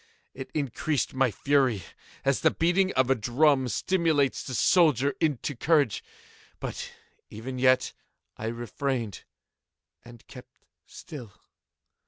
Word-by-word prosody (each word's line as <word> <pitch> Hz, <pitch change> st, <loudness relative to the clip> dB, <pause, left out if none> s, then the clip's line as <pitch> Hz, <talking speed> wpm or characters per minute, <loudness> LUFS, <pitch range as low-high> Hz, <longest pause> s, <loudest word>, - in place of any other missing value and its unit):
It 135 Hz, 0 st, -8 dB
increased 145 Hz, 0 st, -1 dB
my 130 Hz, -1 st, +2 dB
fury, 130 Hz, -3 st, +1 dB, 0.4 s
as 135 Hz, -1 st, +2 dB
the -, -, +5 dB
beating 185 Hz, +3 st, +1 dB
of 130 Hz, 0 st, +2 dB
a -, -, +7 dB
drum 130 Hz, +3 st, +2 dB
stimulates 160 Hz, -2 st, +1 dB
the 130 Hz, -, -6 dB
soldier 145 Hz, -6 st, +3 dB
into 145 Hz, -2 st, -1 dB
courage. 145 Hz, -, +2 dB, 0.6 s
But -, -, -5 dB, 0.4 s
even 125 Hz, +4 st, -6 dB
yet 130 Hz, 0 st, +3 dB, 0.4 s
I 110 Hz, -, -5 dB
refrained 120 Hz, 0 st, -3 dB, 0.8 s
and 120 Hz, -1 st, -15 dB
kept -, -, -14 dB, 0.3 s
still. 125 Hz, -, -10 dB
135 Hz, 115 wpm, -27 LUFS, 120-150 Hz, 0.8 s, a